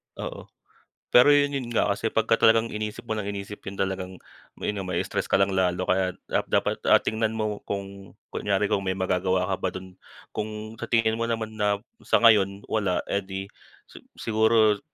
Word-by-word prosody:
Oo, - - -7 0.7
pero 125 +4 +7
'yon, 145 0 +5
'yon 135 -4 -3
nga, 105 - +2
kasi 100 +3 -2
pagka 110 0 +1
ka - - +7
talagang 115 0 +3
iniisip 105 +1 -5
mo 115 - -3
ng 105 -2 -3
iniisip 100 0 -6
'yon 100 - -7
talagang 95 -1 -3 0.4
mai-stress 95 -4 -2
ka - - +4
lang 100 0 +2
lalo 90 -1 +1
kaya, 95 0 0 0.2
ah, - - +3
dapat - - 0 0.2
tingnan 110 0 -1
mo 105 -1 -2
kung 100 -1 -6 0.2
kunyari 100 0 0
kung 100 - +2
may 95 -1 -2
magagawa 95 0 +1
ka - - +1
ba 95 - 0
do'n. 95 0 -8 0.4
Kung 110 +1 -5
sa - - -5
tingin 115 -1 +2
mo 115 - 0
naman 110 -1 -2
na 105 0 +2 0.2
sa - - +2
ngayon 100 -3 +4
wala, 100 -5 -1
eh 100 - +1
'di 95 0 -6 0.7
siguro, 110 -1 +3
105 Hz, 175 wpm, -26 LUFS, 95-110 Hz, 0.7 s, pero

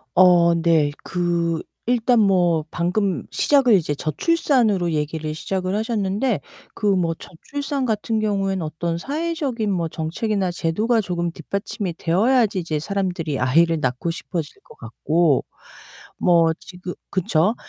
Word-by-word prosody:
어 175 -2 +6
네. 165 -3 +2
그 170 -2 0 0.2
일단 240 0 +3
뭐 175 -6 +3
방금 180 +2 -1
시작을 275 -5 +3
이제 155 -5 0
저출산으로 210 - +1
얘기를 155 0 -2
시작을 185 +4 -3
하셨는데 215 +1 -1 0.3
그 210 - -2
뭐 170 -3 +1
저출산 280 - -4
같은 220 -1 -1
경우에는 195 -3 0
어떤 165 +2 -3
사회적인 280 - -2
뭐 170 -3 0
정책이나 180 +5 -2
제도가 210 +8 0
조금 175 -4 -2
뒷받침이 190 +2 -4
되어야지 210 +5 +2
이제 165 -3 -2
사람들이 175 -5 -2
아이를 165 +6 +3
낳고 130 +4 -1
싶어질 165 -2 -6
것 - - -16
같고. 150 +6 +1 0.7
뭐 170 -2 +4
지금 180 +1 -8 0.2
그쵸. 185 +3 +1
180 Hz, 290 characters per minute, -22 LUFS, 165-215 Hz, 0.7 s, 어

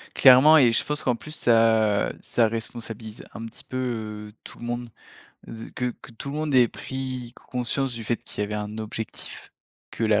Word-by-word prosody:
Clairement 135 +4 +8
et 125 -6 +6
je - - +2
pense 150 0 -1
qu'en 125 - +2
plus 155 +6 -10
ça 110 -5 +3
ça 115 -2 +2
responsabilise 115 -1 -6
un 115 - -6
petit 115 - -10
peu 110 -5 -4
tout - - -11
le 120 - -7
monde, 120 0 -3 0.6
z 115 0 -7
que 125 - -1
que - - -12
tout 125 +5 -6
le 145 - -4
monde 155 -2 -1
ait 125 -2 +7
pris 130 -1 -5
c - - -17
conscience 125 +1 -2
du 115 -1 -6
fait 120 +2 0
qu'il - - -7
y - - +2
avait 105 +1 -4
un 105 +1 -4
objectif, 110 0 -6 0.4
que - - -5
la 110 -2 +4
115 Hz, 200 wpm, -25 LUFS, 110-130 Hz, 0.6 s, Clairement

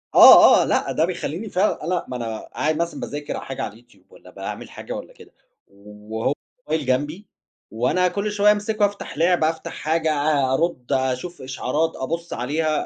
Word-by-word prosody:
آه، - - +9
آه، - - +1
لأ، - - 0
ده 160 - +2
بيخلّيني 180 +3 -4
فعلًا 190 -1 0
أنا 180 +1 -1
ما 125 - -6
أنا 115 -2 -4
قاعد 155 +1 -2
مثلًا 170 +1 -2
باذاكر 145 0 -5
حاجة 135 - -6
على 100 - -5
اليوتيوب 110 -4 -22
والّا - - -16
باعمل - - -7
حاجة - - -8
والّا - - -8
كده، - - -17 0.4
وهو 105 +4 -5 0.3
الموبايل 155 - -2
جنبي، 145 +10 -1 0.4
وأنا 125 +11 +1
كلّ 200 +3 -2
شوية 205 0 +4
أمسكه 210 0 +1
أفتح 200 -7 -5
لعبة 165 -1 +3
أفتح 160 0 -6
حاجة 160 0 0
أ 145 -3 +1
أرد 135 -4 -1
أشوف 130 +6 -1
إشعارات، 135 +5 -1
أبُصّ 165 +5 -4
عليها، 155 +5 -1
155 Hz, 175 wpm, -22 LUFS, 130-175 Hz, 0.4 s, آه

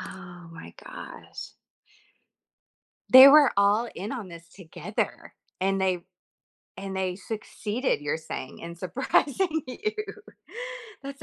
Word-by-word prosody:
Oh 175 -2 -10
my 165 -1 -11
gosh. - - -9 1.6
They 260 +2 +12
were 290 -2 +8
all 205 +4 +3
in 200 +6 -5
on 225 -8 -5
this 170 0 -12
together, 170 -2 -5 0.3
and 195 +1 +1
they 185 -2 0 0.7
and 195 0 -6
they 185 -1 -1
succeeded, 215 - -3
you're 145 +1 -1
saying 155 -4 -7
in 170 0 -8
surprising 280 - 0
you. 415 - -3 1.1
That's 275 0 -8
195 Hz, 110 wpm, -27 LUFS, 175-260 Hz, 1.6 s, They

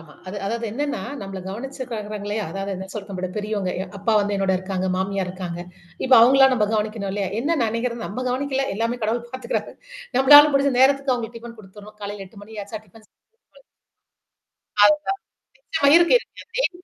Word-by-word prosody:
ஆமா, 155 -2 -15
அது 185 +2 -6
அதாவது 230 +3 -2
என்னன்னா, 285 +4 -2 0.2
நம்மள 195 -1 -6
கவனிச்சுக்கிறாங்கள்லயா? 215 -3 -5
அதாவது 195 +1 -4
என்ன 190 +1 -7
சொல்றது? 205 -2 -7
நம்மளவிட 185 -1 -4
பெரியவங்க 210 -3 -2
எ - - -4
அப்பா 215 +3 0
வந்து 205 0 -1
என்னோட 195 -1 +1
இருக்காங்க, 185 0 -3
மாமியார் 190 0 -1
இருக்காங்க. 180 -2 -6 0.4
இப்ப 260 - +6
அவுங்களெல்லாம் 265 +3 +6
நம்ம 215 -4 +2
கவனிக்கணும் 215 -2 -2
இல்லையா? 200 -1 -2
என்ன 320 +6 0
நினைக்கிறது, 230 +1 -2
நம்ம 255 +5 -5
கவனிக்கல, 270 +1 -1
எல்லாமே 230 +3 -1
கடவுள் 235 +2 -2
பாத்துக்கிறாரு. 260 - -4 0.4
நம்மளால 290 +2 +9
முடிஞ்ச 275 0 +3
நேரத்துக்கு 275 0 +4
அவுங்களுக்கு 235 -1 -5
டிஃபன் 230 0 -11
குடுத்துறோம், 210 +2 -14
காலையில 200 -1 -6
8 200 +2 -15
மணி 215 0 -8
ஆச்சா? 210 +1 -7
டிஃபன் 215 +3 -19
செஞ் - - -63 0.4
குடு - - -19 1.2
அதுதான், 300 - +4 0.5
நிச்சயமா - - 0
இருக்கு, 345 +7 +6
இருக்கு. 480 - -14
டெய்லி 375 -8 -1
220 Hz, 170 wpm, -22 LUFS, 200-265 Hz, 1.2 s, நம்மளால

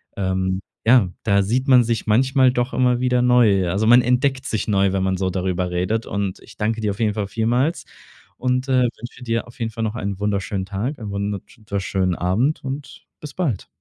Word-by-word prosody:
ähm, 95 0 -1 0.2
ja, 115 -5 +5
da 100 -2 +3
sieht 125 +7 -1
man 125 -2 +6
sich 115 -1 -2
manchmal 130 +4 +4
doch 125 0 -1
immer 125 -1 +2
wieder 125 -1 +2
neu. 115 -7 +4
Also, 100 +5 0
man 120 +2 +7
entdeckt 130 +2 +1
sich 110 -4 -2
neu, 100 -2 +2
wenn 95 -1 0
man 95 0 0
so 95 0 -1
darüber 90 -1 -1
redet 90 +6 -1
und 100 -2 -3
ich - - -16
danke 110 +1 -1
dir 105 -2 0
auf 100 - -8
jeden 105 -2 +2
Fall 100 -1 -3
vielmals 120 - 0 0.5
und, 125 +1 -1
äh, 130 -1 +4
wünsche 120 +1 -5
dir 115 -1 -1
auf 120 - -16
jeden 115 -1 -2
Fall 115 0 -4
noch 110 0 -2
einen 100 -4 -3
wunderschönen 100 -1 -1
Tag 105 +9 -3
und - - -18
einen 105 - -5
wunderhübsch 100 0 -4
schönen 95 -2 0
Abend 110 - 0
und 135 0 -7
bis 150 -2 -9
bald. 140 - -2
110 Hz, 210 wpm, -21 LUFS, 100-125 Hz, 0.5 s, man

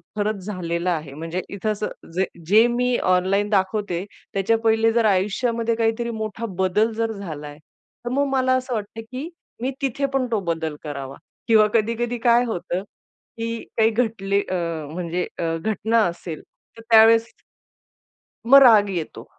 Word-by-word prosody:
खरंच 210 -2 -2
झालेला 180 -3 -2
आहे. 155 -5 -4
म्हणजे 165 +4 -4
इथे 200 +2 -3
असं 210 -4 -5
जे 190 +1 +2 0.2
जे 215 +5 +6
मी 245 0 +1
ऑनलाईन 195 +3 +2
दाखवते, 190 -2 0 0.3
त्याच्या 200 +4 +2
पहिले 225 0 +3
जर 235 -1 +2
आयुष्यामध्ये 225 +4 +1
काहीतरी 225 +1 0
मोठा 220 0 -4
बदल 190 +4 +2
जर 225 0 -1
झालाय, 155 -8 -7 0.5
तर - - -2
मग 280 +2 +2
मला 260 -1 +2
असं 255 0 -2
वाटतं, 220 0 -5
की 265 +6 -5 0.3
मी 260 +2 -1
तिथे 275 +1 -1
पण 270 -1 +1
तो 220 - +1
बदल 160 -2 -3
करावा 140 -3 -6 0.3
किंवा 215 -2 +5
कधी-कधी 230 +2 0
काय 240 0 +5
होतं, 180 -3 -3 0.5
की 230 0 -4
काही 220 0 +5
घटले 215 -4 0
अ, - - -2 0.4
म्हणजे 175 +1 -3
अ, - - -1
घटना 220 +5 +1
असेल, 170 -2 -5 0.4
तर 225 - -10
त्यावेळेस 225 0 +6 1.2
मग 275 +3 +9
राग 215 -5 +7
येतो. 170 -4 -5
215 Hz, 150 wpm, -22 LUFS, 185-230 Hz, 1.2 s, मग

